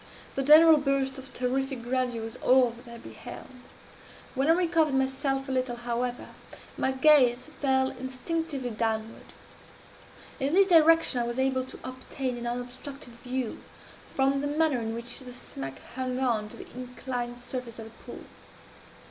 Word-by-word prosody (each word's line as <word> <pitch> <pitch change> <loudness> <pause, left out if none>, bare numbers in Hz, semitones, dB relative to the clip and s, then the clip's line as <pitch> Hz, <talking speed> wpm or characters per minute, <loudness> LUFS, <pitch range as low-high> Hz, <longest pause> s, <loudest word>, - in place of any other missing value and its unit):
The 275 - -1
general 310 +3 +8
burst 275 -1 0
of 265 0 -11
terrific 260 0 -1
grandeur 245 -2 -1
was 225 +1 -6
all 255 -2 +4
that 240 +2 -14
I 235 - -8
beheld. - - -10 0.8
When 270 +2 0
I 325 - +7
recovered 330 -4 +2
myself 270 +1 0
a - - -3
little, 255 -2 0
however, 240 +1 -3 0.5
my - - 0
gaze 265 -1 +4
fell 265 -1 +2
instinctively 260 +1 -4
downward. 220 0 -3 1.1
In 280 +4 0
this 395 +1 +7
direction 330 -6 +5
I 235 - -1
was 240 +1 -4
able 260 -1 +1
to 260 - -11
obtain 255 0 -4
an 240 - -4
unobstructed 245 +2 -6
view, 250 0 -4 0.5
from 270 +1 +2
the 290 - -1
manner 300 -2 +2
in 225 0 -3
which 235 +2 -5
the 250 -2 -10
smack 135 - -8 0.2
hung 255 0 -2
on 235 -5 +1
the - - -10
inclined 250 -1 -5
surface 245 -1 -6
of 225 - -7
the 225 0 -12
pool. - - -9
260 Hz, 155 wpm, -28 LUFS, 240-275 Hz, 1.1 s, general